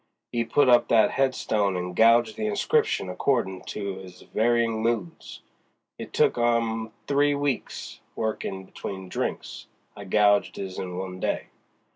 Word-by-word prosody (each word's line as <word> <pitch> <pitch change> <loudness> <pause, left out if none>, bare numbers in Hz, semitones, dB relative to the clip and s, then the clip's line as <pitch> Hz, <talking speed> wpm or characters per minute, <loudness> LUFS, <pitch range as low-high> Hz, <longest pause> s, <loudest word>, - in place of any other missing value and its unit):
'E 120 -1 +1
put 130 +5 +2
up 120 -1 +5
that 110 -2 +4
headstone 110 -7 0
and 90 0 -4
gouged 115 +1 +5
the 110 - -2
inscription 100 -2 +1
accordin' 95 -1 0
to 100 -2 -4
his 90 -1 -12
varyin' 115 0 +1
moods. 110 -7 -3 0.6
It - - -7
took - - +2
'im 115 -2 +1
three 145 +1 +2
weeks, 140 -3 -3 0.2
workin' 105 -3 -3
between 95 0 -7
drinks. - - -4 0.3
I 100 - -9
gouged 100 +1 +3
his 95 -2 -6
in 90 -1 -5
one 95 0 -5
day." - - -2
110 Hz, 140 wpm, -26 LUFS, 95-120 Hz, 0.6 s, up